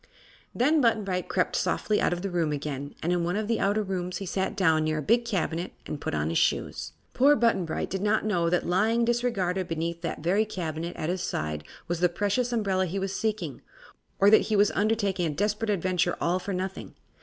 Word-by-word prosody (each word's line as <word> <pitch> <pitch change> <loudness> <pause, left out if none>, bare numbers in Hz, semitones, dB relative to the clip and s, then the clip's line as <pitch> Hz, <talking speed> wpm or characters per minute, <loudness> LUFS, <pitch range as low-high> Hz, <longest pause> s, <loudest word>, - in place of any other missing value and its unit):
Then 295 +5 +3
Button 225 -3 +3
Bright 180 -2 -3
crept - - 0
softly 210 - 0
out - - +2
of 175 +1 -3
the 195 - -2
room 170 -3 0
again, 145 -1 -4
and 175 +2 +1
in 175 -1 0
one 175 +2 -1
of 215 0 -1
the 230 0 0
outer 205 +2 +1
rooms 185 -2 -3
he 195 - -5
sat 190 +3 -2
down 160 -5 +3
near 155 0 0
a - - -1
big 235 - +3
cabinet 180 -5 -2
and 145 - -5
put - - -2
on 75 +1 0
his 85 - +1
shoes. - - -1 0.2
Poor 280 +3 +5
Button 230 -7 +2
Bright 160 - -3
did 190 0 -2
not 210 +1 +1
know 175 -5 +1
that 180 0 +1
lying 220 +6 +2
disregarded 200 -7 0
beneath 165 0 -3
that 165 -3 -4
very 190 +6 +3
cabinet 170 -5 -4
at 155 - -3
his 180 0 -1
side 75 0 -3 0.2
was 175 -1 -2
the 180 0 +3
precious 205 +7 0
umbrella 195 -5 +1
he 185 +4 -4
was 195 0 -2
seeking, 205 -10 -2 0.6
or 200 +1 +5
that 220 - +7
he 215 - +2
was 205 0 +4
undertaking 200 -4 +1
a 150 - -3
desperate 210 +3 0
adventure 185 -2 +1
all 180 +2 +1
for 200 - -5
nothing. 190 +1 -4
190 Hz, 220 wpm, -27 LUFS, 170-210 Hz, 0.6 s, that